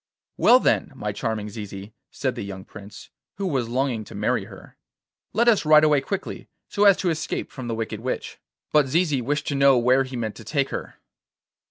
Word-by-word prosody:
'Well, - - +6
then, - - +1
my - - -3
charming 110 -2 -3
Zizi,' 100 -1 -8 0.2
said 130 -2 -2
the 120 - -6
young 95 -2 -7
Prince, 100 +2 -12 0.2
who 195 - -4
was 130 -10 -1
longing 125 -2 -1
to - - -11
marry - - 0
her, - - -14 0.6
'let 235 +3 +2
us 230 -4 +5
ride 155 0 +6
away 150 -2 +4
quickly 195 +6 -5 0.2
so 205 - +2
as 200 -2 +7
to 180 - 0
escape 160 0 -3
from 130 -3 -7
the 115 - -2
wicked 110 -1 -4
witch.' 125 +3 -4 0.3
But 150 -2 +4
Zizi 150 -2 +1
wished 145 +4 -1
to - - -1
know 140 -1 +5
where 125 +3 +4
he 130 -1 -8
meant 110 -3 -3
to - - -10
take 140 -3 -1
her. - - -6
130 Hz, 200 wpm, -24 LUFS, 115-150 Hz, 0.6 s, as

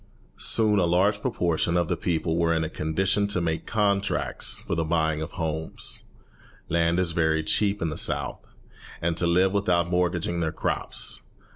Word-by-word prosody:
Soon 105 -2 +3
a 90 - +3
large 95 +4 +2
proportion 85 -7 0
of 85 -2 +1
the - - 0
people 80 -1 -1
were 85 0 +2
in 80 - 0
a 80 - -3
condition 95 +7 0
to 100 -2 0
make 80 -2 -2
contracts 100 -2 0
for - - -5
the 85 -1 0
buying 80 -1 0
of 80 - -6
homes 80 -2 -3 0.6
(land 85 +1 +2
is 90 -2 0
very 80 -1 +1
cheap 100 +3 +1
in 80 - 0
the 75 - -2
South) - - -1 0.6
and 85 0 0
to 85 - +1
live 90 +3 +3
without 90 -4 +1
mortgaging 90 -1 0
their 80 -2 0
crops. - - -3
85 Hz, 170 wpm, -26 LUFS, 80-95 Hz, 0.6 s, Soon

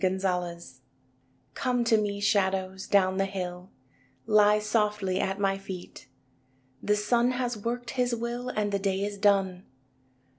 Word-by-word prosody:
CONSOLATION 180 -2 0
I 130 -6 -14 0.7
Come 250 -2 0
to 230 -1 +3
me, 205 -2 0
shadows, 190 -2 0
down 190 -2 +3
the 195 0 +1
hill, 180 -1 -5 0.6
Lie 210 -1 +5
softly 210 -3 0
at 195 -1 -1
my 195 -1 +1
feet. 190 -2 -9 0.7
The 210 - +2
sun 235 +4 +2
has 245 -1 -1
worked 235 +3 -4
his 250 -2 0
will 240 +2 -4
And 210 -4 -1
the 200 - 0
day 195 0 -1
is 205 -1 -5
done. 195 -3 +2
200 Hz, 145 wpm, -28 LUFS, 190-225 Hz, 0.7 s, Lie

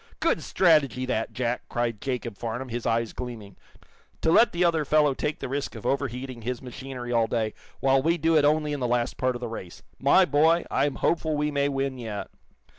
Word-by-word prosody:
"Good - - +1
strategy, 150 -8 +3
that, 115 -3 -1
Jack!" 125 -1 -3
cried 120 -3 -2
Jacob 125 -4 -3
Farnum, 120 +4 -5
his 120 0 -3
eyes 115 -1 0
gleaming. 115 -5 -7 0.7
"To 160 - +2
let 235 - +6
the 175 +1 +1
other 165 -2 +2
fellow 150 -1 +3
take 150 +3 -2
the - - -4
risk 140 0 -3
of 110 - -9
overheating 130 -2 -2
his 125 +2 -3
machinery 125 -1 -7
all 115 -2 +3
day, 110 -2 -1 0.3
while 135 0 +4
we 165 +4 +2
do 165 +1 +2
it 150 - +5
only 150 0 +2
in 145 - -3
the 125 - 0
last 120 0 0
part 130 -1 0
of 120 - -6
the 120 - -3
race. 95 -6 -8 0.2
My 140 +8 +5
boy, 160 +3 +3
I'm 145 -1 +1
hopeful 160 -2 0
we 150 0 0
may 140 0 +1
win 135 -1 -2
yet." 110 -4 -5
130 Hz, 205 wpm, -26 LUFS, 120-150 Hz, 0.7 s, let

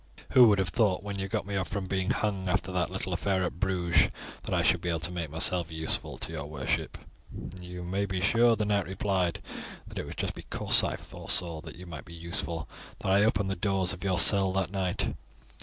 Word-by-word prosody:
Who 125 -2 +8
would 105 -2 +5
have 95 -2 +1
thought 100 -2 +2
when 100 -1 -4
you 95 - -2
got 95 - -2
me 100 0 -4
off 95 0 0
from 100 -3 -3
being 95 0 -1
hung, 95 -3 0
after 95 0 0
that 90 -2 0
little 95 0 -3
affair 95 +1 +1
at 90 - -3
Bruges, 90 -2 +3 0.4
that - - -5
I - - +2
should - - +3
be 90 - -2
able 85 -1 0
to 90 - +1
make 85 -3 -3
myself 85 +2 +2
useful 80 0 -3
to - - -3
your 75 -3 -4
worship?" 75 -3 -2 0.6
"You 90 0 -7
may 95 +3 -1
be 95 -1 -2
sure," 115 +4 +4
the 105 -1 -1
knight 100 -2 +1
replied, 95 -2 0 0.4
"that - - -7
it - - -5
was - - -7
just - - -2
because - - +1
I - - 0
foresaw 85 -3 -1
that - - -9
you 90 +2 -10
might 80 -4 -8
be 85 - -11
useful 85 -1 -3 0.3
that 95 - 0
I 100 +2 +5
opened 100 -3 +2
the - - 0
doors 95 -1 0
of 95 - -8
your 95 -2 +1
cell 95 +1 +5
that 95 -1 0
night. 95 -3 -1
95 Hz, 225 wpm, -29 LUFS, 85-100 Hz, 0.6 s, Who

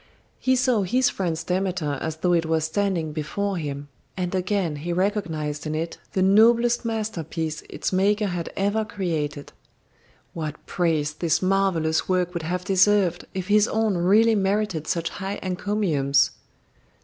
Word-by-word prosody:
He 260 0 +2
saw 250 -3 +2
his 250 +7 +2
friend's 165 -4 -2
Demeter 180 -5 -1
as 160 -1 -3
though 175 +2 +1
it 165 -1 +2
was 160 -1 +1
standing 170 -2 -1
before 185 +6 -2
him, 145 -3 -5 0.3
and 180 -1 -2
again 185 -4 0
he 165 +4 -4
recognised 165 -6 -1
in 155 - -2
it 165 +2 -4
the 190 - +2
noblest 230 +5 +4
masterpiece 170 -9 -3
its - - -3
maker 205 +3 +2
had 175 -4 -3
ever 205 +3 +1
created. 160 -9 -3 0.8
What 155 -2 -6
praise 160 -4 0
this 165 +2 0
marvellous 185 -5 +1
work 180 -1 +1
would 170 - -3
have 180 +3 -3
deserved 190 -2 +3
if 185 -1 -3
his 210 0 +4
own 220 -2 +1
really 205 +6 +4
merited 195 -5 0
such 170 -1 -1
high 195 0 -5
encomiums! 180 -8 +1
180 Hz, 150 wpm, -24 LUFS, 160-205 Hz, 0.8 s, noblest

